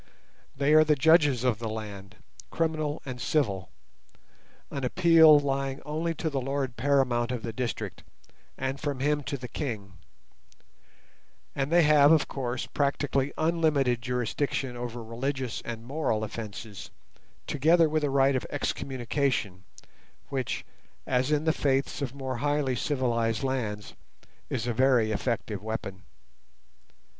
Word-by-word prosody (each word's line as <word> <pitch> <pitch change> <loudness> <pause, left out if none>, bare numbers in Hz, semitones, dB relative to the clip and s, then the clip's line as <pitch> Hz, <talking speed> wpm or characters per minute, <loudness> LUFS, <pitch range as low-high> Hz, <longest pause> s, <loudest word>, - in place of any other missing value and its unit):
They 140 +2 +3
are 155 0 +8
the 155 -1 +3
judges 145 -4 +4
of 120 -4 +1
the 115 -1 -3
land, 100 -3 -7 0.3
criminal 155 -2 -1
and 125 -2 -6
civil, 100 - 0 1.0
an 140 - -4
appeal 160 +1 +6
lying 135 -1 -1
only 160 +2 -2
to 160 - -3
the 135 -2 -1
lord 135 -1 -2
paramount 125 -4 +1
of 125 -3 -4
the 115 - -4
district, 120 +1 -4 0.6
and 135 +1 -3
from 145 -3 -3
him 145 +2 +1
to 140 0 -4
the 125 -1 -7
king; 110 - -5 1.6
and 140 +2 -1
they 175 0 +6
have, 150 -1 +6
of 160 -2 +4
course, 125 -2 -3
practically 140 -1 0
unlimited 155 -7 +2
jurisdiction 125 +2 -2
over 120 -1 -5
religious 130 +2 -3
and 115 -1 -6
moral 130 -5 -1
offences, 105 -1 -7 0.6
together 160 +4 +4
with 155 0 0
a 145 - +1
right 135 0 +3
of 130 - -2
excommunication, 130 -8 -2 0.6
which, 130 -3 -3 0.4
as 130 +2 +1
in 150 0 +2
the 160 0 +2
faiths 135 -1 0
of 135 -1 -3
more 130 -2 -4
highly 145 -1 0
civilized 120 -4 0
lands, 110 -6 -3 0.6
is 120 -4 -2
a 120 - -1
very 125 -3 +3
effective 110 -2 -2
weapon. 105 -4 -5
135 Hz, 135 wpm, -28 LUFS, 120-145 Hz, 1.6 s, are